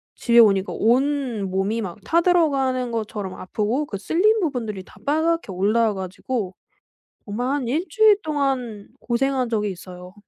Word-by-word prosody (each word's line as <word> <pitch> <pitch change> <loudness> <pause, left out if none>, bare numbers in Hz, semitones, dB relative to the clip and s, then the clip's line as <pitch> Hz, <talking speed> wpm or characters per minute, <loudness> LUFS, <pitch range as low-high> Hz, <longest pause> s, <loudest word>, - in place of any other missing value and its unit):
집에 235 -1 +3
오니까 195 -3 +4
온몸이 230 -5 0
막 180 -5 -6
타 335 +6 +2
들어가는 270 -8 +2
것처럼 215 -4 -4
아프고 220 +9 -2
그 205 - -5
쓸린 420 - +2
부분들이 230 - -3
다 - - -19
빨갛게 315 -3 0
올라와 210 +4 +2
가지고 190 +2 -4 0.7
정말 230 +3 -3
한 270 -2 -1
1 310 +8 0
주일 435 -3 +5
동안 265 -8 -2
고생한 255 +1 0
적이 210 -3 -1
있어요. 180 0 -11
235 Hz, 305 characters per minute, -22 LUFS, 205-285 Hz, 0.7 s, 주일